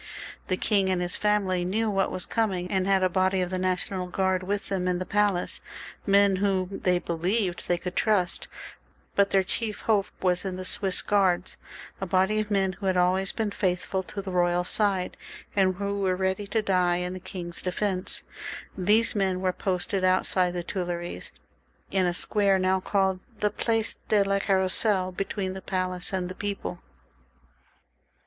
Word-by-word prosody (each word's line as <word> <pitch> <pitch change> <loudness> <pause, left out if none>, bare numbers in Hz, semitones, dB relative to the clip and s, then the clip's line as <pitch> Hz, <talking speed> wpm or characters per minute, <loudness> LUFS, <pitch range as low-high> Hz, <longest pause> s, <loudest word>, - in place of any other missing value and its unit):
The 185 - 0
king 195 -2 +2
and 185 -1 +1
his 180 0 -2
family 200 -4 +1
knew 215 +5 0
what 195 -2 +1
was 185 - -2
coming, 190 -6 -1
and 190 -1 +1
had 195 -1 +3
a - - +5
body 185 +1 +1
of 180 0 -1
the 185 - -1
National 185 0 -1
Guard 190 0 0
with 200 +2 -2
them 185 -2 -1
in 180 -1 +1
the 185 - -3
palace 205 -3 +1 0.2
— - - -16
men 200 -1 +4
whom 195 -1 0
they 180 -1 +3
believed 175 +3 -1
they 175 - +2
could 180 +1 -6
trust; 200 -5 +1 0.7
but 200 0 +4
their 195 -1 +3
chief 210 +3 -2
hope 210 -3 +2
was 180 -1 +1
in 190 -2 -3
the 185 0 -5
Swiss 190 0 +1
Guards, 190 -3 +2 0.5
a 190 - -2
body 190 +4 +2
of 215 -1 -2
men 195 -2 +1
who 195 +2 -5
had 185 -1 +2
always 185 +2 +3
been 220 -2 -2
faithful 190 -1 -1
to 200 +2 -7
the 190 - -5
royal 175 0 +2
side, 195 -1 0 0.4
and. 190 -2 +3
who 200 +1 -2
were 190 -2 +1
ready 190 +2 -1
to 215 +2 0
die 180 -3 +2
in 180 +1 -2
the 185 - -6
king's 175 -2 -6
defence. 185 0 -1 0.5
These 210 +5 +3
men 190 -3 0
were 185 -1 0
posted 185 +1 -1
outside 185 -1 +2
the 175 - -2
Tuileries, 175 -2 -4 0.6
in 190 -2 +2
a 175 - -1
square 200 0 +3
now 190 0 +2
called 190 -1 +1 0.2
the 210 0 +1
Place 225 -1 -1
de 210 -2 +4
la 200 0 +1
Carrousel, 190 0 +2
between 190 +1 -3
the 190 - -7
palace 185 -1 -2
and 185 -2 -1
the 185 - -6
people. 200 -3 -4
190 Hz, 180 wpm, -27 LUFS, 180-200 Hz, 0.7 s, a